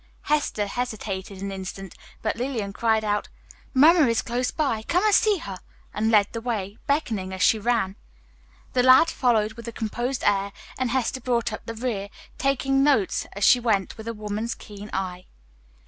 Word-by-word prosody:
Hester 295 -8 0
hesitated 200 -4 -4
an 200 - -3
instant, 190 -1 -7 0.3
but 220 - 0
Lillian 230 -5 -3
cried 220 0 +1
out, 210 -1 -1 0.4
"Mamma 305 +2 +6
is 230 -1 +1
close 245 +1 -1
by, 270 -8 -1
come 360 - +1
and 425 - +4
see 420 0 +4
her," 195 - -7 0.3
and 220 +1 0
led 210 -3 +5
the 230 - -4
way, 215 -4 -3
beckoning 225 -10 -1
as 190 0 -2
she 220 - +4
ran. 220 -4 0 0.8
The 250 - +3
lad 260 +6 +6
followed 220 -4 +1
with 235 +1 -10
a - - -4
composed 240 +3 -3
air, 200 0 +1 0.2
and 255 -1 -1
Hester 260 +1 -1
brought 235 -2 0
up - - -8
the 230 - -5
rear, 220 -4 -3 0.3
taking 270 -1 +2
notes 270 -10 +2
as 200 - -4
she 250 - +7
went 215 -5 0
with 220 0 -10
a 230 - -2
woman's 215 +2 -3
keen 205 0 -10
eye. 185 -1 -4
225 Hz, 180 wpm, -25 LUFS, 205-255 Hz, 0.8 s, she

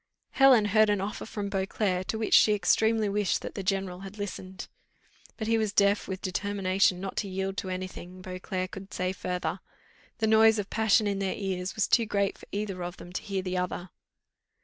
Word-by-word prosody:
Helen 265 -6 +6
heard 215 -1 +5
an 205 -1 +2
offer 200 +3 -4
from 205 -2 -4
Beauclerc, 190 -1 -1
to 220 - -1
which 220 - -1
she 210 - +7
extremely 220 +3 +2
wished 200 -1 0
that - - -6
the 200 - -4
general 190 -1 -1
had 195 +2 -9
listened. 190 -2 -6 0.7
But 220 - -3
he 225 0 +2
was 215 -2 0
deaf 200 +1 +3
with 190 -1 -5
determination 190 -1 +1
not 195 0 -6
to 200 - -1
yield 190 +1 -3
to 190 - -3
any 185 0 -3
thing 185 0 -10
Beauclerc 185 0 -4
could 195 +1 -9
say 185 +1 -1
further: 180 0 -3 0.6
the 225 - 0
noise 220 0 +6
of 205 -1 -4
passion 220 0 +3
in 200 -1 -1
their 195 -1 -1
ears 190 -2 -3
was 215 - +1
too 230 -2 +3
great 200 -2 0
for - - -14
either 200 -3 -3
of 175 +1 -6
them 175 - -11
to - - -3
hear 195 -2 -3
the 185 0 -1
other. 180 0 -4
195 Hz, 205 wpm, -28 LUFS, 185-210 Hz, 0.7 s, she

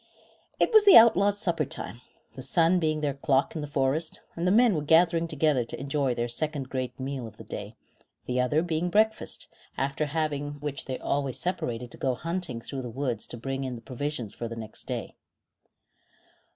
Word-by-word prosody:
It - - +2
was 435 -1 +8
the 400 - +10
outlaws' 205 -3 +6
supper 175 -7 0
time, 120 -3 -6 0.3
the 130 - -8
sun 165 +6 +3
being 155 -2 0
their 145 -2 0
clock 140 +2 +1
in 155 - -2
the 150 - -4
forest; 145 +3 -1
and 170 +2 -1
the - - +4
men 230 +1 +5
were 155 - 0
gathering 165 +2 +4
together 150 -5 +2
to 115 - -7
enjoy 135 -2 0
their 120 0 -1
second 140 +2 -3
great 130 -1 -4
meal 130 -2 -4
of 105 -1 -14
the - - -10
day, 105 +2 -7 0.5
the 125 0 0
other 150 +6 +2
being 170 0 -1
breakfast, 220 +4 +1 0.3
after 140 +3 -1
having 145 -1 -2
which 145 -1 -5
they 130 -1 -3
always 140 -3 -1
separated 125 -10 -3
to - - -8
go 130 -2 0
hunting 165 -3 -4
through 135 +3 -5
the 125 - -6
woods 125 -2 -3
to - - -8
bring 135 +3 -3
in 130 -2 -3
the 115 - -9
provisions 130 -4 -4
for 120 - -5
the 115 - -6
next 110 -1 -7
day. - - -4
145 Hz, 195 wpm, -27 LUFS, 125-165 Hz, 0.5 s, the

